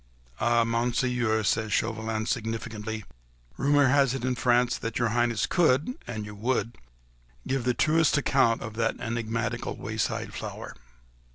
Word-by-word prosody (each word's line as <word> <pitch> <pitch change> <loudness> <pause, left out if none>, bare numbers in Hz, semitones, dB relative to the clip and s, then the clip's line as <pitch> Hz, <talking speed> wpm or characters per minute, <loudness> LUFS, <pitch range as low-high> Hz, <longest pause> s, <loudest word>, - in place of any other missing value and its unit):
"Ah, 120 0 +3
Monseigneur," 120 -1 0
said 110 +1 0
Chauvelin, 110 0 -1
significantly, 110 -2 -3 0.5
"rumour 145 0 +3
has 135 -1 +3
it 130 -2 -3
in 130 - +1
France 125 0 +2
that 115 +1 -3
your 120 -2 +1
Highness 120 -1 +1
could—an 140 - 0
you 105 0 -8
would—give - - -4
the 125 -1 +1
truest 160 0 +3
account 130 -5 +2
of 110 - -6
that 115 -1 0
enigmatical 115 0 -2
wayside - - -3
flower." - - -6
115 Hz, 125 wpm, -27 LUFS, 110-125 Hz, 0.5 s, Ah